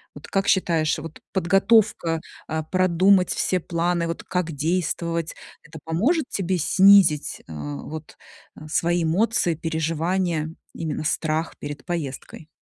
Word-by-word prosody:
Вот - - -11
как 195 0 -1
считаешь, 165 -5 +2
вот 160 0 -9
подготовка, 195 -2 +3 0.3
а, 160 0 -2
продумать 185 +2 +3
все 185 - 0
планы, 170 0 -1
вот 165 - -5
как 180 -2 -2
действовать- 165 +1 -2 0.3
это 160 0 -12
поможет 245 - +1
тебе 190 -1 -1
снизить, 185 -2 +4
а, 75 -2 -6
вот, 155 0 -9 0.4
э, 155 - -10
свои 170 +2 +1
эмоции, 175 +2 +1
переживания, 165 +1 -1 0.2
именно 155 -2 -4
страх 160 +1 -1
перед 145 -2 -7
поездкой? 155 -2 -5
170 Hz, 125 wpm, -23 LUFS, 160-185 Hz, 0.4 s, снизить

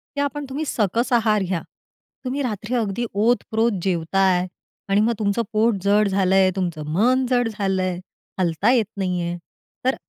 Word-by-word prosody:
की 285 - 0
आपण 285 +1 -2
तुम्ही 290 +4 -3
सकस 230 0 0
आहार 220 -3 +3
घ्या. 180 -2 -2 0.6
तुम्ही 265 +3 -2
रात्री 220 0 -3
अगदी 225 0 -1
ओतप्रोत 225 +1 +1
जेवताय 185 +1 +1 0.4
आणि 200 +1 +3
मग 230 +2 +2
तुमचं 205 +2 +1
पोट 220 +1 +3
जड 205 +1 +3
झालंय. 190 -1 +3
तुमचं 170 -5 -3
मन 250 +8 +3
जड 245 -2 +2
झालंय. 190 -4 -1 0.4
हलता 180 +5 +2
येत 235 -4 +3
नाहीये. 180 -2 -1 0.5
तर, 260 - +2
210 Hz, 150 wpm, -22 LUFS, 190-235 Hz, 0.6 s, आहार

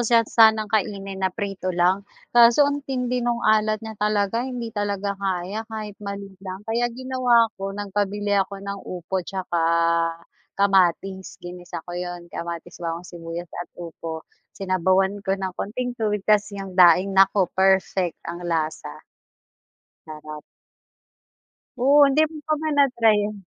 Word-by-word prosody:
san 230 -1 +4
sanang 220 -1 +5
kainin 195 -2 -1
na 190 - +2
prito 195 -1 -4
lang, 185 +3 +2 0.3
kaso 240 +4 +7
ang 285 0 0
tindi 250 -1 -1
nung 240 0 -1
alat 215 0 +2
niya 220 -2 -8
talaga 210 +1 +1
hindi 240 -3 -5
talaga 205 -1 -2
kaya 190 +2 -2
kahit 215 -2 -6
maliit 200 -1 -7
lang, 190 +1 -8
kaya 235 +2 0
ginawa 250 -3 +2
ko 195 - -2
nagpabili 205 0 -2
ako 195 0 -4
ng 200 0 -4
upo 180 +1 -5
'tsaka 180 -2 -3 1.0
kamatis, 190 -1 +1
ginisa 175 -2 -8
ko 175 - -8
'yun, 175 0 -5
kamatis, 170 +1 -6
bawang, 170 0 -4
sibuyas 170 0 -7
at 175 - -7
upo, 165 -1 -7 0.3
sinabawan 190 +1 +1
ko 195 -1 -1
ng 190 -1 -4
konting 245 +6 -4
tubig 210 -2 -1
ta's 210 -1 +3
yung 195 -1 -6
daing 180 +1 +5
naku, 195 0 +4
perfect 190 -2 +2
ang 170 +1 -6
lasa. 160 -2 -3 1.0
Sarap. 155 -1 -9 1.4
Oo, 280 +4 +5
hindi 275 +3 +2
mo 320 - -10
pa 310 - +2
ba 315 - -2
na-try 245 -6 +4
'yun? 205 -1 -5
200 Hz, 145 wpm, -23 LUFS, 180-220 Hz, 1.4 s, kaso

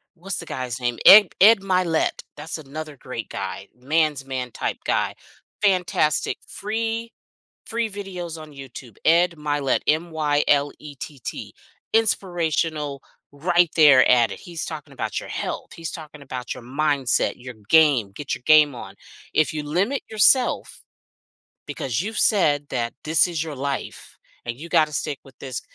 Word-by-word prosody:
what's 180 +1 -5
the - - -5
guy's 130 -1 -4
name? 120 -1 -1
Ed 205 -1 +10
Ed 220 +1 +8
Mylett, 185 -4 0
that's 160 +2 -5
another 155 +1 -8
great 125 -3 -7
guy. 95 0 -5
Man's 150 +1 0
man 130 -2 -4
type - - -3
guy. - - 0 0.5
Fantastic. 180 -6 +1
Free 225 +2 -3 0.5
free 230 -1 -2
videos 180 -5 -7
on 155 -1 -12
YouTube. 130 -4 -11
Ed 170 +2 +5
Mylett. 145 -3 0
M-Y-L-E-T-T. 150 -3 -1 0.4
Inspirational, 165 -9 0 0.3
right 175 +3 +2
there 145 -5 +7
at 120 -2 +4
it. - - -7
He's 170 -3 -7
talking - - -8
about - - -3
your - - -10
health. - - -5
He's 165 -1 -6
talking 150 -2 -10
about 125 -3 -6
your - - -11
mindset, 140 0 0
your 125 -1 -10
game. 145 -10 +4
Get 145 - -4
your 125 - -13
game 150 -2 +6
on. 100 -5 -9 0.4
If 155 - +2
you 150 -1 -3
limit 190 - 0
yourself, 225 +4 +3 0.9
because 130 +4 -2
you've 215 +3 -5
said 145 -9 +3
that 120 -2 -2
this 160 +3 +3
is 165 -2 -2
your 155 -3 -6
life 140 0 -5 0.3
and 120 +2 -5
you 170 +2 -9
gotta 155 -1 +3
stick 145 -1 -3
with 135 -3 -17
this 130 -3 -5
150 Hz, 145 wpm, -23 LUFS, 135-175 Hz, 0.9 s, Ed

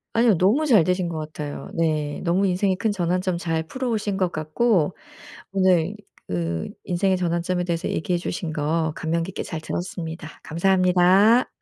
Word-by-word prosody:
아니요. 230 -5 +4
너무 220 - +3
잘 215 - +6
되신 180 0 0
것 160 - -4
같아요. 150 -1 -6
네. 155 -3 -1
너무 185 +3 +2
인생의 185 +1 +1
큰 220 +2 0
전환점 180 -1 0
잘 165 -2 -1
풀어오신 215 -1 -2
것 185 -2 0
같고, 155 +3 +1 0.6
오늘 185 -1 +2 0.3
그 85 -2 -2 0.2
인생의 185 +1 +1
전환점에 175 0 -1
대해서 170 -1 -2
얘기해 175 +2 -1
주신 170 -2 -4
거 155 +1 0
감명 165 +1 -1
깊게 190 - -5
잘 160 - -5
들었습니다. 165 -1 -5
감사합니다. 185 +6 +4
175 Hz, 330 characters per minute, -23 LUFS, 160-190 Hz, 0.6 s, 잘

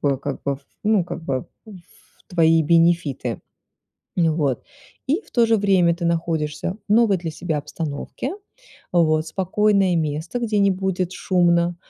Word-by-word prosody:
бы 140 -2 +1
как 140 0 -5
бы, 140 -1 0
в - - -21 0.2
ну, 210 -4 +3
как 170 - -7
бы, 130 -4 -2 0.2
в 185 -5 -17
твои 165 -2 +4
бенефиты. 165 -2 +2 0.8
Ну 165 -3 +2
вот, 145 -6 0 0.4
и 300 +8 +1
в - - -23
то 235 - +3
же 225 0 +3
время 190 -4 +3
ты 170 +1 -6
находишься 165 +1 -1
в - - +2
новой 215 -4 +4
для 165 -1 -4
себя 160 -1 -3
обстановке, 155 - -5 0.6
вот, 155 -2 +3
спокойное 195 +1 +2
место, 160 +6 -2
где 220 -3 0
не 200 -1 +4
будет 185 -1 -1
шумно, 175 -2 +2
170 Hz, 155 wpm, -22 LUFS, 160-195 Hz, 0.8 s, твои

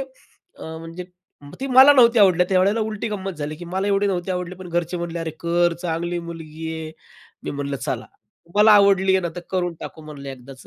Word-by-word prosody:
अ, - - -14
म्हणजे 165 +2 -8 0.4
मग 145 - -12
ती 270 - -2
मला 265 +2 +8
नव्हती 240 -3 +5
आवडल्या 180 -3 +5
त्यावेळेला 195 +4 +2
उलटी 220 +1 -4
गंमत 195 -2 -4
झाली, 150 +1 -4
की 175 - -9
मला 190 +3 -2
एवढे 200 0 +2
नव्हते 185 -1 -2
आवडली, 180 0 -4
पण 185 0 -10
घरचे 175 +1 -2
म्हणले 170 0 -4
"अरे, 165 -1 -3
कर, 175 0 +2
चांगली 170 +1 -2
मुलगी 160 -1 -8
आहे." 160 -1 -6 0.5
मी - - -3
म्हणलं 140 -1 -3
चला. 125 -1 -3 0.4
"तुम्हाला 210 +5 +5
आवडली 195 -1 +4
आहे 190 - +3
ना, 175 - -2
तर - - -4
करून 175 -2 -1
टाकू 160 - -9
म्हणलं 140 -2 -9
एकदाच." 130 0 -11
175 Hz, 205 wpm, -22 LUFS, 165-195 Hz, 0.5 s, मला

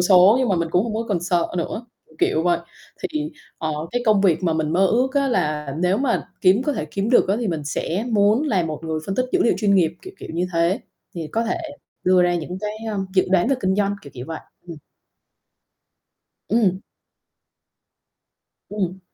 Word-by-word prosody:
số 185 +3 +6
nhưng 260 -2 +1
mà 190 - +2
mình 170 -1 0
cũng 180 +5 +2
hông 225 - -3
có 225 - -1
còn 190 -5 0
sợ 175 -1 +1
nữa, 215 +7 -4 0.2
kiểu, 155 - -23
kiểu 160 - +2
vậy. 175 -1 +2 0.4
Thì, 155 -4 -2 0.3
ờ, 155 -1 -2 0.2
cái 245 0 -1
công 210 -2 +5
việc 185 -3 +3
mà 170 - +2
mình 155 -1 -1
mơ 190 +3 +4
ước 255 +7 +1
á, 280 -1 +2
là 150 - -1
nếu 180 +2 +2
mà 265 -2 0
kiếm 195 +5 +4
có 295 - 0
thể 155 - -3
kiếm 195 +8 -3
được 245 - +5
á, 200 - +2
thì 230 - -1
mình 160 -4 -3
sẽ 165 +7 -2
muốn 210 +5 +4
là 210 - +1
một 155 -2 -4
người 160 -1 -2
phân 195 - -2
tích 255 - +1
dữ 370 - +3
liệu - - +3
chuyên 200 -2 +2
nghiệp, 165 -4 +3
kiểu, 375 +1 -10
kiểu - - -9
như 180 +2 0
thế, 170 +3 +1 0.3
thì 165 -3 -4
có 230 +1 +1
thể 235 +10 -1 0.5
đưa 185 0 +5
ra 175 0 +2
những 175 +2 -4
cái, 210 0 -3 0.2
ơ, 205 - -2 0.2
dự 185 - +4
đoán 190 +3 +3
về 275 - +3
kinh 190 0 +1
doanh, 205 -1 +1
kiểu, 140 - -11
kiểu 125 -1 -7
vậy. 160 -1 -5 0.3
Ừm. 170 - -7 1.7
Ừm. 200 -4 +2 1.9
Ừm. 190 -3 -3
185 Hz, 215 wpm, -22 LUFS, 170-215 Hz, 1.9 s, số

